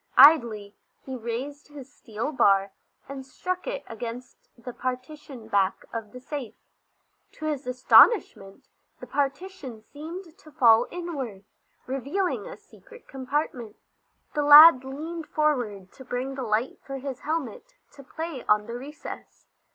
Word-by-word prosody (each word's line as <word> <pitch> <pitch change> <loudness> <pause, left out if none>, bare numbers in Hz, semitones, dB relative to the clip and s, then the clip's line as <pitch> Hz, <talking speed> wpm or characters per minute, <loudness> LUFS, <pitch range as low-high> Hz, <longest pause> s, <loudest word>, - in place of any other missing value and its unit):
Idly 230 -9 +6 0.3
he 265 - -6
raised 255 +5 -6
his 285 -1 -12
steel 230 +4 -5
bar, 195 -7 +3 0.4
and 275 -1 -7
struck 365 +8 -5
it - - -4
against 235 +2 -9
the 240 +1 -9
partition 255 -1 -6
back 200 -3 0
of 225 -2 -6
the 250 - -10
safe. 265 -3 -7 0.8
To 310 - -8
his 290 -4 -3
astonishment 250 - +4 0.3
the - - -9
partition 280 - -4
seemed 325 - -10
to 310 - -16
fall 230 -3 +5
inward, 275 - -6 0.4
revealing 280 +9 -2
a - - -9
secret 485 -1 -18
compartment. 260 -4 -4 0.6
The 295 - 0
lad 295 -1 +9
leaned 315 +5 -7
forward 240 -11 -1
to 265 - -13
bring 255 +2 -4
the 270 - -6
light 225 +1 -1
for 275 0 -6
his 270 -1 -6
helmet 330 +12 -5 0.2
to 285 - -14
play 315 -1 -6
on 210 0 +3
the 235 - -7
recess. 290 +3 -10
270 Hz, 135 wpm, -26 LUFS, 235-305 Hz, 0.8 s, lad